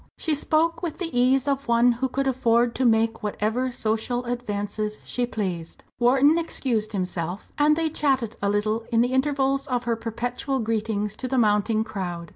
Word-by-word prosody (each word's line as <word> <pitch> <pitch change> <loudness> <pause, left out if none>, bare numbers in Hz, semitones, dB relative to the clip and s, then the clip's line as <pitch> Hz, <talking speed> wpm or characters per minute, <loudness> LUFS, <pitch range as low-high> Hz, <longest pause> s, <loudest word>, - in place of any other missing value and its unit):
She 320 - 0
spoke 325 +3 +1
with 340 -4 -4
the 335 -7 -4
ease 255 +2 +3
of 275 -1 -1
one 235 +1 +4
who 250 +3 -1
could 275 +2 -1
afford 240 -2 +2
to 260 - 0
make 225 -1 +2
whatever 220 +4 -1
social 225 +2 -1
advances 215 -3 -3
she 245 -1 -2
pleased. 185 -8 -4 0.2
Wharton 270 +6 +4
excused 235 -9 -2
himself, 180 -1 -4
and 300 +1 +4
they 325 0 0
chatted 270 -7 0
a 200 - +1
little 215 +2 0
in 230 0 +4
the 245 +2 +1
intervals 275 0 +1
of 250 -2 -1
her 235 -1 0
perpetual 245 +4 -3
greetings 215 -2 -1
to 255 - -4
the 260 +1 -1
mounting 215 -1 +2
crowd. 175 -6 -5
240 Hz, 175 wpm, -24 LUFS, 215-265 Hz, 0.2 s, one